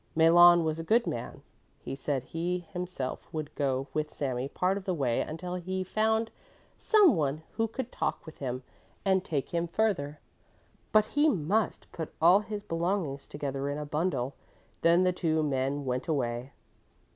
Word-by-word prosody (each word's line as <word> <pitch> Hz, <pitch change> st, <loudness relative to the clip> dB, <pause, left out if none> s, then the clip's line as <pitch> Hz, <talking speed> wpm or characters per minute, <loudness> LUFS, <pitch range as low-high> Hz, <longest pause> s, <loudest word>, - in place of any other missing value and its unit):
Malon 175 Hz, +1 st, +7 dB
was 160 Hz, 0 st, -1 dB
a -, -, -3 dB
good 230 Hz, +7 st, +3 dB
man; 115 Hz, -, -5 dB, 0.3 s
he -, -, -7 dB
said 135 Hz, -1 st, -2 dB
he 175 Hz, +4 st, -3 dB
himself 180 Hz, -8 st, -4 dB
would 155 Hz, -2 st, -5 dB
go 135 Hz, -2 st, 0 dB
with 155 Hz, 0 st, -1 dB
Sami 130 Hz, -2 st, -2 dB
part 185 Hz, +5 st, +1 dB
of 200 Hz, -1 st, -5 dB
the 185 Hz, -, 0 dB
way 130 Hz, -6 st, +1 dB
until 180 Hz, +3 st, -5 dB
he 185 Hz, +1 st, -3 dB
found 220 Hz, +3 st, +1 dB, 0.4 s
some 410 Hz, -, +5 dB
one 150 Hz, -1 st, -1 dB
who 225 Hz, 0 st, 0 dB
could 250 Hz, +2 st, -5 dB
talk -, -, -2 dB
with 160 Hz, -, -11 dB
him 130 Hz, -1 st, -3 dB, 0.4 s
and 190 Hz, -1 st, +3 dB
take 145 Hz, -7 st, -2 dB
him 170 Hz, 0 st, 0 dB
further; 165 Hz, -7 st, 0 dB, 0.7 s
but 215 Hz, -1 st, +5 dB
he 295 Hz, +2 st, +4 dB
must 200 Hz, -, 0 dB
put 160 Hz, -2 st, -5 dB
all 175 Hz, +5 st, +7 dB
his 210 Hz, 0 st, -5 dB
belongings 165 Hz, -5 st, -2 dB
together 140 Hz, -1 st, -3 dB
in 145 Hz, -, -2 dB
a 150 Hz, -, -4 dB
bundle. 145 Hz, -4 st, -1 dB, 0.5 s
Then 170 Hz, +2 st, +5 dB
the 180 Hz, 0 st, +3 dB
two 160 Hz, -3 st, +1 dB
men 140 Hz, 0 st, -1 dB
went 125 Hz, 0 st, -2 dB
away. 125 Hz, -4 st, -2 dB
165 Hz, 170 wpm, -29 LUFS, 140-185 Hz, 0.7 s, Malon